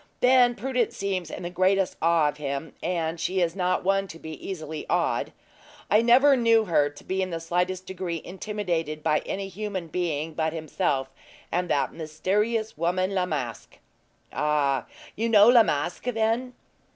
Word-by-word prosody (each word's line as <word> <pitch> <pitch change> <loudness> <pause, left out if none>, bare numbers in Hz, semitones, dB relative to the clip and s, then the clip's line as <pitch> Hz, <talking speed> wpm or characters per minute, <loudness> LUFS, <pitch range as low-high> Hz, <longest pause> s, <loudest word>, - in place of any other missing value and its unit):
Then 250 -1 +5
Prudence 250 0 -1
seems 190 -4 -2
in 180 - -7
the 175 - -4
greatest 185 +1 +2
awe 165 -2 +4
of 150 - -3
him, 140 +1 -4
and 165 -1 -2
she 185 +3 -1
is 170 -1 +1
not 180 -1 0
one 195 +1 +1
to 165 - -10
be 160 -1 -9
easily 160 -5 -5
awed. - - 0 0.6
I 210 +2 +6
never 260 +4 +6
knew 230 -3 +4
her 150 -6 +2
to 145 - -15
be 190 +1 -2
in 185 - -1
the 165 -2 -3
slightest 180 +3 -1
degree 180 -3 -4
intimidated 175 -5 -3
by 155 -1 +2
any 195 0 -3
human 195 -3 -5
being 160 -2 -2
but 160 0 -1
himself 155 -4 -1 0.4
and 180 +1 -1
that 140 - +1
mysterious 205 +8 -1
woman, 185 +4 0
La 185 -2 0
Masque. 130 -9 -5 0.6
"Ah! 145 -4 +1 0.3
you 230 +2 -1
know 210 -1 +7
La 240 -1 +8
Masque, 170 -1 -1
then?" 235 +1 0
180 Hz, 165 wpm, -26 LUFS, 160-205 Hz, 0.6 s, La